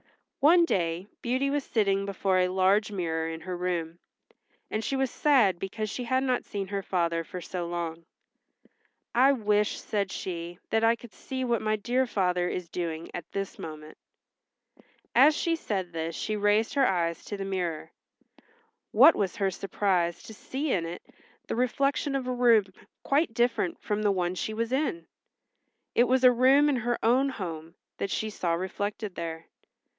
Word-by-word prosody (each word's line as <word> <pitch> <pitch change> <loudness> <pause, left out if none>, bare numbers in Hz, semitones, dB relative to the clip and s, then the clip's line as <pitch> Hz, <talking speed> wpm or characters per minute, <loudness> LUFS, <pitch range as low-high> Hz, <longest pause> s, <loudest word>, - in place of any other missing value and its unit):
One 335 +4 +6
day 175 - -1 0.2
Beauty 260 +3 0
was 290 -1 0
sitting 200 -5 +1
before 190 -1 +1
a 180 - +3
large 190 +3 +2
mirror 165 -4 -2
in 160 0 -6
her 180 +2 -5
room, 175 -2 -3 0.7
and 215 - -1
she 275 - -1
was 265 -1 0
sad 235 - +3
because 210 +3 -4
she 250 - -4
had 260 +2 +1
not 255 -2 0
seen 200 -1 -4
her 200 -1 -2
father 170 -3 0
for 180 +3 -7
so 175 0 -5
long. 170 -1 -4 1.1
"I 265 +3 +5
wish," 210 -3 +1
said 200 -3 -2
she, 170 -1 -5
"that 225 0 +2
I 230 +1 +5
could 235 -3 -14
see 260 -1 -4
what 235 -2 +1
my 215 0 +1
dear 245 +5 0
father 180 -4 0
is 180 -2 -4
doing 165 -2 -4
at 175 - -7
this 195 -1 -4
moment." 155 -1 -8 1.2
As 290 +5 +6
she 335 -1 +1
said 190 - -3
this 165 0 -3
she 215 - -2
raised 210 +2 +2
her 275 -2 +4
eyes 170 -3 -1
to 205 - -5
the 195 - -4
mirror. 180 -5 -3 1.0
What 275 +9 +7
was 195 -1 -1
her 195 -3 0
surprise 185 -2 -1
to 220 - -10
see 270 +7 -3
in 165 -3 0
it 170 +1 -7 0.4
the - - -3
reflection 275 +3 0
of 265 -2 -1
a 255 - -1
room 235 -4 +5 0.4
quite 280 -3 +1
different 235 -7 +1
from 210 0 -2
the 205 -1 +3
one 180 -2 0
she 215 +4 -3
was 230 +1 -2
in. 310 +5 -1 0.9
It 240 - +4
was 260 +1 +2
a 255 - +9
room 265 +4 +5
in 275 - +1
her 240 0 -1
own 260 +4 +4
home 165 -8 -6 0.2
that 200 - -2
she 215 +2 -2
saw 175 -4 -1
reflected 200 +3 -3
there. 165 -1 -5
205 Hz, 175 wpm, -28 LUFS, 175-245 Hz, 1.2 s, a